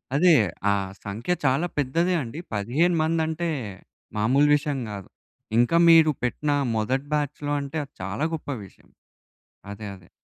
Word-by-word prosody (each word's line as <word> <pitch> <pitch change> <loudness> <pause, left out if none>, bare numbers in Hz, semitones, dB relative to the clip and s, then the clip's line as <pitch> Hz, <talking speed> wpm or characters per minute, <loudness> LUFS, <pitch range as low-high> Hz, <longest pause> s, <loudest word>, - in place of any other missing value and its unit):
అదే, 170 +3 +6 0.4
ఆ - - +4 0.3
సంఖ్య 110 - -2
చాలా 135 +7 +2
పెద్దదే 165 +6 +1
అండి. 125 +8 -7
15 140 - +1
మంది 160 +1 +1
అంటే 165 +1 -2 0.7
మామూలు 130 +7 +3
విషయం 145 -2 -2
గాదు. 100 -3 -8 0.5
ఇంకా 120 +8 +3
మీరు 160 -2 +7
పెట్టిన 145 +4 -1 0.2
మొదటి 130 +6 0
బ్యాచ్‌లో 145 0 -1
అంటే 140 +3 -5
అది 140 - -27
చాలా 100 +11 -2
గొప్ప 150 - -9 0.2
విషయం. 95 - -20 0.8
అదే 105 +1 -7
అదే. 90 -2 -19
145 Hz, 140 wpm, -25 LUFS, 120-160 Hz, 0.8 s, మీరు